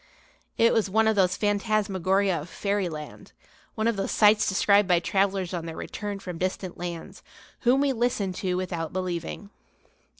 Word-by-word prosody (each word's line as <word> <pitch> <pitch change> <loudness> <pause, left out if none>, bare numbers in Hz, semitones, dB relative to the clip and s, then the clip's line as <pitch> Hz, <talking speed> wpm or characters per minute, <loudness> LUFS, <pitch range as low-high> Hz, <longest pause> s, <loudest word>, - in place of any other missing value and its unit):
It 230 0 +4
was 215 -3 +1
one 220 +3 +3
of 220 - +3
those 185 -2 +3
phantasmagoria 200 -3 +1
of 160 - -10
fairyland, 175 -5 -4 0.4
one 220 - -1
of 230 -3 +1
those 195 - -2
sights 215 0 +4
described 200 +1 +3
by 175 -2 +4
travellers 190 0 0
on 170 -2 -4
their 165 - -6
return 205 -1 -5
from 180 -4 -7
distant 185 0 -3
lands, 175 -2 -7 0.4
whom 255 +2 +3
we 280 -1 +2
listen 225 -5 0
to 185 -1 -2
without 175 -3 -3
believing. 185 +2 -4
195 Hz, 160 wpm, -26 LUFS, 180-210 Hz, 0.4 s, It